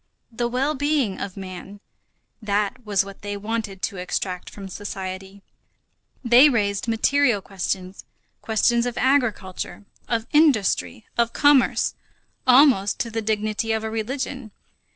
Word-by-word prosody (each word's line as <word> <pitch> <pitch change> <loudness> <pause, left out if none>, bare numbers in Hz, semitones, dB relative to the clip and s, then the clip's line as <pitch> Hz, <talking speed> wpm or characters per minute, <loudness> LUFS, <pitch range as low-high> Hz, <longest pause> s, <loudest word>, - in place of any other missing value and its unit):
The 235 +1 -1
well 260 +5 0
being 285 -7 0
of 200 -1 -6
man, 190 +1 -8 0.6
that 210 +3 -1
was 200 -2 +1
what 195 0 -11
they 205 0 -4
wanted 210 -2 -4
to 200 - -2
extract 180 0 -3
from 195 -2 -9
society. 190 0 -7 0.8
They 245 +5 +7
raised 205 -4 0
material 240 +1 +2
questions, 190 -1 -4 0.4
questions 235 +2 +2
of 245 - -5
agriculture, 225 -7 0 0.2
of 230 -1 -1
industry, 215 - +2
of 235 0 +2
commerce, 285 -3 +3 0.5
almost 250 -6 +5
to 230 - -3
the 225 0 -2
dignity 215 0 -1
of 220 0 -1
a 220 - -3
religion. 260 +2 -4
215 Hz, 130 wpm, -23 LUFS, 195-245 Hz, 0.8 s, They